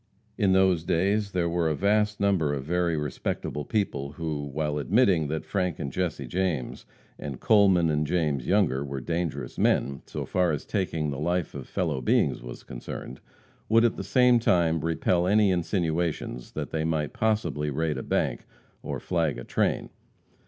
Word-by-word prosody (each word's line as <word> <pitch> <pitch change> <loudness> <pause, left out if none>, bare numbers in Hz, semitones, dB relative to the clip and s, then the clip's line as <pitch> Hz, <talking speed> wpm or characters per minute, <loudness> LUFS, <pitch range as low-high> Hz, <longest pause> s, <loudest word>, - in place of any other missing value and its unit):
In 100 -4 +2
those 95 -3 +3
days 100 +5 +1
there 90 -2 0
were 85 -1 +1
a 75 - 0
vast 105 +4 +1
number 90 -8 +2
of 70 - -4
very 85 +1 0
respectable 75 0 -3
people 70 -7 -2
who, 75 -3 -3
while 75 +1 -2
admitting 95 - +3
that 80 +2 -3
Frank 90 -5 -1
and 70 - -4
Jesse 80 -4 -2
James, 85 -2 -2 0.3
and 70 -4 -6
Coleman 95 -6 +4
and 75 0 0
James 75 -7 0
Younger, 90 -9 +2
were 70 -1 -4
dangerous 85 -3 -3
men, 70 0 +1
so - - -4
far 90 -2 +1
as 75 - -4
taking 80 -7 -1
the 70 - -4
life 85 +1 -1
of - - -7
fellow 65 - -1
beings - - +2
was - - -9
concerned, 65 +1 -8 0.5
would 115 +2 +5
at 115 - +2
the - - -5
same 125 -2 +4
time 85 -7 +2
repel 85 +2 +1
any 105 0 +4
insinuations 85 - -1
that - - -4
they 80 -1 -1
might 80 -3 -1
possibly 105 -9 0
raid 75 +2 -1
a - - -3
bank - - -1 0.3
or - - -4
flag 80 -7 0
a 60 - -6
train. - - -1
85 Hz, 170 wpm, -27 LUFS, 75-95 Hz, 0.5 s, would